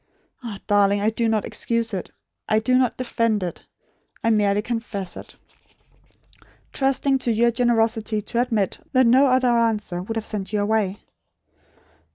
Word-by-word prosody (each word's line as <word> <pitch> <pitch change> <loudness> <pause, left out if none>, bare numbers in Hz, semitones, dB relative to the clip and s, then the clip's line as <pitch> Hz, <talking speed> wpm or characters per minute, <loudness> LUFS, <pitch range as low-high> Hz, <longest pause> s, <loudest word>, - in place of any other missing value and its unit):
Ah, 230 -5 -6
darling! 205 0 +3
I 210 +2 +1
do 230 +1 0
not 220 -2 0
excuse 230 -1 -2
it. 185 - -4 0.4
I 215 - +3
do 230 +4 +2
not 255 -2 +2
defend 230 -4 0
it. 175 - -5 0.6
I 230 - +3
merely 205 -1 +2
confess 220 -6 -4
it; - - -11 1.4
trusting 270 0 +1
to 245 - 0
your 235 +2 +3
generosity 225 -2 +1
to 235 +3 -1
admit, 225 -6 -1
that 260 -1 +5
no 260 +4 +5
other 255 -1 +3
answer 225 -6 0
would 225 +5 -5
have 220 - -3
sent 210 -1 -5
you 210 - +1
away. 205 -2 0
225 Hz, 155 wpm, -23 LUFS, 210-240 Hz, 1.4 s, that